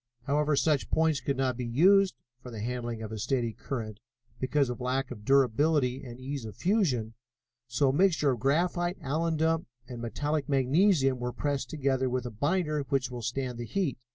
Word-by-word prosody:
However, 145 +2 +1
such 150 -1 +1
points 160 -2 +2
could 140 -2 -2
not 130 -1 0
be 125 - -4
used 185 +8 +4 0.3
for 125 - -9
the 115 -3 -7
handling 120 -2 -3
of 110 - -6
a 110 - -5
steady 120 0 -1
current 110 -5 -5 0.4
because 135 +2 +1
of 125 +1 -5
lack 130 +1 -1
of 105 -4 -8
durability 135 +1 +2
and 120 -1 -9
ease 135 0 -5
of 110 -2 -8
fusion, 155 - +1 0.5
so 125 +3 +2
a - - +1
mixture 160 -3 +3
of 125 - -2
graphite, 175 - +1
alundum 160 +2 0 0.2
and 120 -2 -7
metallic 145 +6 -2
magnesium 135 0 +3
was 125 0 -4
pressed 140 -4 -1
together 135 -2 0
with 125 0 -2
a 120 - -4
binder 150 - 0
which 135 -2 0
will 120 -1 -5
stand 125 +1 -3
the 120 - -4
heat. 170 - -2
135 Hz, 180 wpm, -29 LUFS, 125-150 Hz, 0.5 s, used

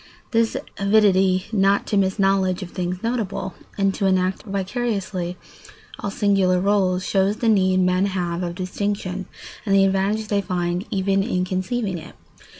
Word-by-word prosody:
This 230 -1 +2 0.2
avidity 195 -2 +3
not 200 -2 +2
to - - -2
miss 190 0 +2
knowledge 195 -2 +2
of 180 - -9
things 180 +1 -3
notable, 205 -5 -2 0.2
and 195 -1 +2
to 195 - 0
enact 185 0 +1
vicariously 195 -3 -3 0.6
all 200 - -3
singular 195 -3 +2
rôles, 190 -2 +1
shows 195 +1 +1
the 230 - -1
need 185 -3 +3
men 185 +2 +2
have 175 -3 -2
of 175 -1 -3
distinction 190 0 -3 0.4
and 200 -3 +1
the 195 0 +5
advantage 195 +3 0
they 200 -1 +1
find 175 -1 -2
even 195 0 +1
in 185 -3 -1
conceiving 185 +1 -2
it. 155 - -12
195 Hz, 150 wpm, -22 LUFS, 185-200 Hz, 0.6 s, the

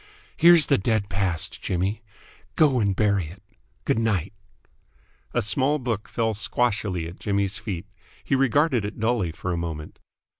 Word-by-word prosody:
"Here's 170 -3 +7
the - - +2
dead 105 0 0
past, 90 -3 -2
Jimmy! 95 +4 -1 0.5
Go 140 -5 +4
and 100 -3 +1
bury 100 -4 +1
it! 85 +5 -13 0.4
Good - - +1
night!" 100 -5 0 1.0
A - - 0
small 135 +8 +2
book 120 -6 -3
fell 110 -1 -1
squashily 105 -5 -1
at 85 - -11
Jimmy's 100 0 -1
feet. 100 -5 -5 0.4
He - - -2
regarded 135 -1 +2
it 105 +2 -6
dully 110 -6 0
for 90 +3 -4
a - - -2
moment. 80 -3 -6
105 Hz, 150 wpm, -24 LUFS, 95-120 Hz, 1.0 s, Here's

